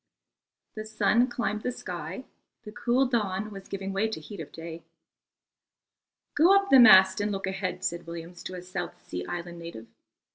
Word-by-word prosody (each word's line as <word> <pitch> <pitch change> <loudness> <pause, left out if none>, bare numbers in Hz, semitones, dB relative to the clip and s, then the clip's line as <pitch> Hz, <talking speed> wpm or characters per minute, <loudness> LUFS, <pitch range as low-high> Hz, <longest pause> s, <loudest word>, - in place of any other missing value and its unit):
The 215 - -6
sun 215 +2 +2
climbed 225 -4 -2
the 250 - -2
sky, 180 -1 -6 0.4
the 210 - -9
cool 245 +3 +1
dawn 215 -4 -1
was 195 -1 -10
giving 195 0 -5
way 200 +3 +1
to 220 - -5
the 155 - -15
heat 205 - -9
of 155 - -8
day. 165 0 -8 1.5
"Go 345 +6 +5
up 395 0 +2
the 270 - +9
mast 190 -4 +8
and 205 +1 -1
look 195 -1 -3
ahead," 190 -1 -3
said 170 -2 -3
Williams 170 +1 -8
to 185 - -5
a 180 - -8
South 180 - -6
Sea 90 - -5
Island 175 0 -6
native. 165 -10 -9
195 Hz, 180 wpm, -27 LUFS, 175-220 Hz, 1.5 s, the